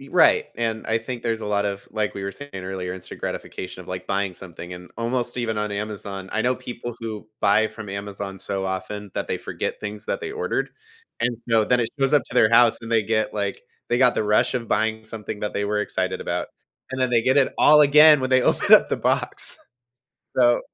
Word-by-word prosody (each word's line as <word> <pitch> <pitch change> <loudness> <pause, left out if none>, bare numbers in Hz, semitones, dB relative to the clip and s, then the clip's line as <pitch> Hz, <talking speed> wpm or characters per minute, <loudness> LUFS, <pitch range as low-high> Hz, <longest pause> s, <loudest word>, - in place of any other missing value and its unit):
Y 135 - -12
right, 175 -3 +5
and 115 -1 -2
I 110 - +1
think 120 +1 -6
there's 115 -2 -1
a - - -5
lot 105 0 +1
of 100 -1 -3
like 105 -1 -2
we 100 - -5
were 100 - -3
saying 145 +5 -10
earlier, 95 -1 -4
instant 90 -1 -10
gratification 90 0 -5
of, - - -17
like, 90 0 -5
buying 100 -1 -1
something, 90 -1 -9
and 90 0 -10
almost 120 +1 -1
even 115 -3 -1
on 105 0 -2
Amazon. 100 -2 -5
I 110 - 0
know 125 +1 +2
people 120 -1 -7
who 110 -2 -6
buy 105 +3 +4
from 110 -1 -9
Amazon 100 0 -6
so 95 0 -3
often 95 +2 -4
that - - -2
they - - -1
forget - - -4
things 105 0 -5
that - - -2
they 435 - -4
ordered, 440 +2 -2 0.5
and 120 0 0
so 115 -2 +4
then 125 +3 +2
it 115 - 0
goes 135 +1 +2
up 145 - +5
to - - -10
their 115 -3 +5
house, 115 0 +5
and 115 0 -6
they 115 - +4
get, 110 +1 0
like, 100 -2 -2 0.3
they 120 - +1
got 125 -1 +5
the - - +1
rush 105 +3 +2
of 115 -3 -3
buying 110 +1 0
something 110 -1 -7
that 105 - -3
they 100 - -1
were 105 +1 0
excited - - -2
about, - - -2 0.5
and 130 - -3
then 130 -1 +2
they 120 -2 +3
get 130 +3 +2
it 140 -2 +4
all 150 0 +7
again 150 0 +7
when 130 - -2
they 130 -1 +5
open - - +2
up - - +5
the - - 0
box. - - 0 0.8
So, 120 -1 +5
110 Hz, 230 wpm, -23 LUFS, 100-120 Hz, 0.8 s, all